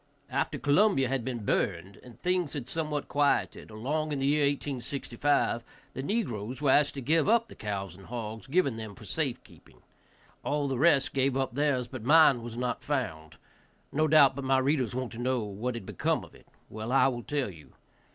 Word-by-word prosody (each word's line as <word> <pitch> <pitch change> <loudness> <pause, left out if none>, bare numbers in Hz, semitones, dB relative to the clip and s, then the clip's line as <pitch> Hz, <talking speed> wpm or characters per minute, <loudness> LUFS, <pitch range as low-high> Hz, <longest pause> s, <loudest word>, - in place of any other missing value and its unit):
After - - -1
Columbia 145 -2 +3
had 135 -3 -1
been 120 -4 -4
burned, 95 0 -1
and 125 -2 -15
things 180 -4 0
had 135 -5 -5
somewhat 150 -1 -2
quieted, 145 -1 0
along 145 +8 -2
in 145 - -1
the 135 - -1
year 145 +1 +3
1865, 140 -2 -1 0.3
the 130 - -4
negroes 130 - -2
were 145 -2 +3
asked 145 +1 +3
to 135 - -4
give 155 +7 +2
up 230 0 +4
the - - -12
cows 95 -4 -5
and 95 +1 -14
hogs 115 0 -6
given 140 -5 +1
them 110 -3 -7
for - - -12
safe - - -2
keeping; - - -20 0.6
all 145 -1 0
the 135 -3 -2
rest 145 -3 +4
gave 135 -1 +1
up 135 -3 -1
theirs, 140 -3 +1
but 130 -1 -7
mine 145 -2 +6
was 115 0 -7
not 125 -1 -2
found. 80 - -3 0.6
No 155 +2 +2
doubt 145 -3 +6
but 140 - -5
my 135 0 +3
readers 130 -2 +1
want 130 -1 -3
to 115 - -8
know 125 0 0
what 105 +5 -4
had 115 - -6
become - - -1
of - - -19
it. - - -19 0.2
Well, 110 +2 -6
I 135 - +5
will 120 -3 -2
tell 140 -4 -2
you. 80 -4 -16
130 Hz, 200 wpm, -29 LUFS, 115-145 Hz, 0.6 s, mine